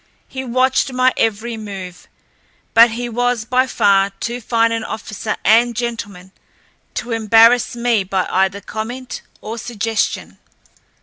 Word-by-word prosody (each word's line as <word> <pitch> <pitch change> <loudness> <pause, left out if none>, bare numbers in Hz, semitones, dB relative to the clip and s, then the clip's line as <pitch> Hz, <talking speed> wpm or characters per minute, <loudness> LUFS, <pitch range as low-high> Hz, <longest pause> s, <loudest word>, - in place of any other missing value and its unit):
He 265 0 -6
watched 260 +2 +1
my 255 0 +2
every 225 +1 -1
move, 195 -4 -8 0.7
but 230 +1 +7
he 240 +2 -4
was 245 -1 -1
by 255 +2 +2
far 200 -5 +3
too 240 +1 -4
fine 230 0 +1
an 230 -1 -2
officer 220 0 -5
and 235 +3 +4
gentleman 210 -6 -5 0.6
to 240 - -4
embarrass 225 +2 +4
me 235 -3 +1
by 190 0 -1
either 190 +2 +1
comment 240 +5 -6 0.2
or 225 +2 -6
suggestion. 225 -1 -2
230 Hz, 130 wpm, -18 LUFS, 210-245 Hz, 0.7 s, but